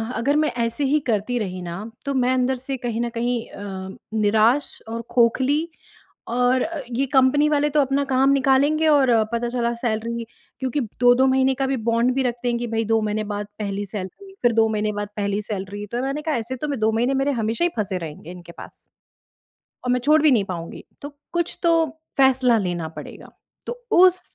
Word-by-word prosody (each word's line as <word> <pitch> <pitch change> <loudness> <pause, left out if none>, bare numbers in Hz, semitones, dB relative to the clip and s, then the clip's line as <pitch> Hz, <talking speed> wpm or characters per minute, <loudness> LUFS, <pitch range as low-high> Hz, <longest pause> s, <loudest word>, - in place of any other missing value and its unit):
अगर 270 +6 +1
मैं 305 0 +2
ऐसे 230 +5 -2
ही 300 +3 +3
करती 230 +1 0
रही 185 -3 -4
ना 170 -1 -5 0.3
तो 280 - -1
मैं 255 -1 +2
अंदर 260 +1 +1
से 260 +2 -4
कहीं 235 -2 -3
न 240 - -1
कहीं 240 +1 -1
अ, 190 -1 -7 0.2
निराश 220 +5 +2
और 230 +1 -4
खोखली 260 +6 +2 0.6
और 250 +2 +2 0.3
ये 265 +4 0
कंपनी 270 +3 +3
वाले 295 0 +2
तो 300 - +3
अपना 275 +1 +1
काम 270 0 +2
निकालेंगे। 280 +3 +3
और 280 -4 +4 0.2
पता 235 +1 -1
चला 235 -1 -1
सैलरी 230 0 -2 0.4
क्योंकि 260 +2 -1 0.2
2-2 245 +2 +5
महीने 265 0 +3
का 270 +1 -1
भी 270 0 0
बॉन्ड 235 +2 +2
भी 270 - +1
रख 245 -2 0
देंगे 240 -1 0
कि - - -2
भई 225 0 0
2 225 +1 +2
महीने 215 0 -1
बाद 205 0 -4
पहली 205 -1 -3
सैलरी, 210 - -7
फिर 240 -1 +4
2 225 0 +3
महीने 215 -1 -1
बाद 205 0 -4
पहली 200 0 -1
सैलरी। 205 0 -5
तो 245 +1 -1
मैंने 275 +3 -2
कहा 310 -1 -1
ऐसे 235 +3 -3
तो 300 +4 -4
मैं 280 - -2
2 220 +1 +2
महीने 240 +4 +1
मेरे 270 +1 +1
हमेशा 225 +9 0
ही 350 - +2
फँसे 195 -3 -1
रहेंगे 160 0 -8
इनके 175 -1 -11
पास। - - -9 1.1
और 250 - 0
मैं 250 - +2
छोड़ 300 +2 +5
भी 305 -2 +5
नहीं 220 -5 +3
पाऊँगी। 170 -3 -7 0.2
तो 285 - -6 0.2
कुछ 345 0 -1
तोह 330 -1 +4 0.3
फैसला 260 -3 +4
लेना 175 -5 -2
पड़ेगा। - - -9 0.4
तो 475 - -3 0.2
उस 365 0 +5
245 Hz, 200 wpm, -22 LUFS, 215-270 Hz, 1.1 s, 2-2